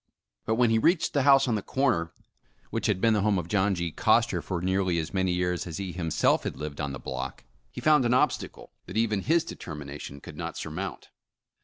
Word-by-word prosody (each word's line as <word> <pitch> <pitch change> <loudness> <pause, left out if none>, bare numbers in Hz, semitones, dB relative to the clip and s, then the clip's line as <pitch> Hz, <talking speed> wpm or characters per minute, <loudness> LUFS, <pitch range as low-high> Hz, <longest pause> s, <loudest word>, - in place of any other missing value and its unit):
But 110 - +2
when 120 -1 +3
he 115 - +3
reached 170 +8 +2
the 140 - +2
house 135 0 +5
on 120 - +1
the 105 - 0
corner, 115 -13 0 0.6
which - - -1
had - - +1
been 115 +2 +3
the 105 - +2
home 105 -1 +2
of 85 -2 -3
John 100 0 +2
G. 85 -1 -2
Coster - - +2
for 95 - -3
nearly 95 -1 +1
as 80 +2 -3
many 95 -1 +1
years 90 0 -1
as 80 - -5
he 95 -2 -4
himself 80 -3 +1
had - - -4
lived 75 -1 -6
in 70 -1 -2
the 70 - -5
block, 65 +1 -6 0.3
he - - -8
found 150 -3 +5
an 120 0 +2
obstacle - - -1 0.2
that 95 - -5
even 110 -3 +1
his 160 - +2
determination 75 - -8
could - - -11
not - - -5
surmount. - - -5
95 Hz, 215 wpm, -27 LUFS, 85-115 Hz, 0.6 s, house